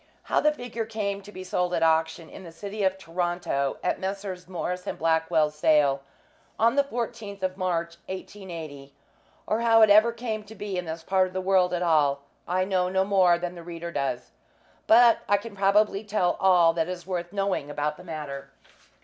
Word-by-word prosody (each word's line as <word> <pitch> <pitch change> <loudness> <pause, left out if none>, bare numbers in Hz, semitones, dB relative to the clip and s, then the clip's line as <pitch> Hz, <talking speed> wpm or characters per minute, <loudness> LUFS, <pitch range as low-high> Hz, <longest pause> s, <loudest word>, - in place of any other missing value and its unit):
How - - +1
the 300 - +3
figure 245 -5 -5
came 200 -3 -3
to 205 +1 -13
be 185 -2 -8
sold 180 -1 -1
by 170 - +1
auction, 160 0 +1
in 190 - -11
the 170 - -10
city 200 +5 -6
of 190 0 +1
Toronto, 175 -6 -2
at - - 0
Messrs. 190 -2 -5
Morris 180 +1 -4
& - - -11
Blackwell's 160 -1 +1
sale 150 -2 +3 0.6
on 230 +3 +3
the 280 - +4
14th 225 -6 -5
of 185 0 -1
March, 170 -3 -2
1880, 165 -8 -8 0.5
or 215 - 0
how 225 -1 +6
it 215 - +6
ever 215 +3 +6
came 230 -2 -4
to 220 - -12
be 205 -2 -5
in 180 -1 -3
this 160 0 -6
part 190 +1 +2
of 185 - -12
the 185 - -2
world 185 -1 +2
at 180 0 -1
all, 145 -4 +2 0.2
I 185 +1 +1
know 185 -2 0
no 190 +1 +1
more 185 -3 +4
than 175 0 -4
the 175 - -10
reader 170 0 -7
does; 135 -5 -3 0.6
but 235 +1 +6
I 205 - +5
can 205 +1 -9
probably 200 +1 +2
tell 200 -4 0
all 175 -3 +5
that 165 0 -1
is 180 -1 -6
worth 175 -2 -4
knowing 195 -7 -1
about 150 +1 -2
the 180 - -12
matter. 145 -5 -7
185 Hz, 195 wpm, -26 LUFS, 165-200 Hz, 0.6 s, how